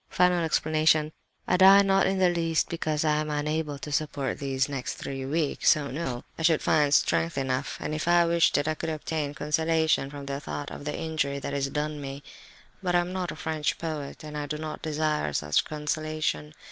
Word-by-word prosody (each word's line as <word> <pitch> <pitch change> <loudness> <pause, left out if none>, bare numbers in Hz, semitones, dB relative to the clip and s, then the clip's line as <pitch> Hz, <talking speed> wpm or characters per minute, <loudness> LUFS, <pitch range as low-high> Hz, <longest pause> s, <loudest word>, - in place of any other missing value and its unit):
"Final 180 -1 +3
explanation: 155 -1 +2 0.4
I - - +3
die, 195 +2 +8
not 195 0 +3
in 190 0 0
the 185 -1 +4
least 165 -2 0
because 155 -2 -1
I 150 -1 +3
am 155 0 -2
unable 150 0 -2
to 150 +1 -7
support 145 -2 -2
these 135 -1 0
next 135 -3 -4
three 135 -1 -5
weeks. 155 +1 +2
Oh 145 -2 -4
no, 130 -4 -4 0.2
I - - -3
should 160 -1 +3
find 150 -2 +3
strength 165 +2 +2
enough, 130 0 -2
and 150 - -4
if 155 +2 -3
I 175 0 +5
wished 170 0 +3
it 145 +1 0
I 155 - +1
could 160 - -4
obtain 155 -2 -3
consolation 160 0 +1
from 140 -1 -8
the 140 0 -3
thought 145 0 -6
of - - -8
the 150 - -3
injury 155 -3 -1
that 140 0 -5
is 140 -1 -1
done 150 +1 -3
me. 140 +1 -7 0.6
But 180 -2 0
I - - +6
am 175 +1 -5
not 185 -2 -2
a - - -7
French 155 -2 -2
poet, 155 -4 -5
and 150 -1 -8
I 145 -1 -3
do 150 +1 -3
not 155 0 -6
desire 155 - -1
such 75 +1 +1
consolation. 150 - -3
155 Hz, 210 wpm, -27 LUFS, 145-160 Hz, 0.6 s, die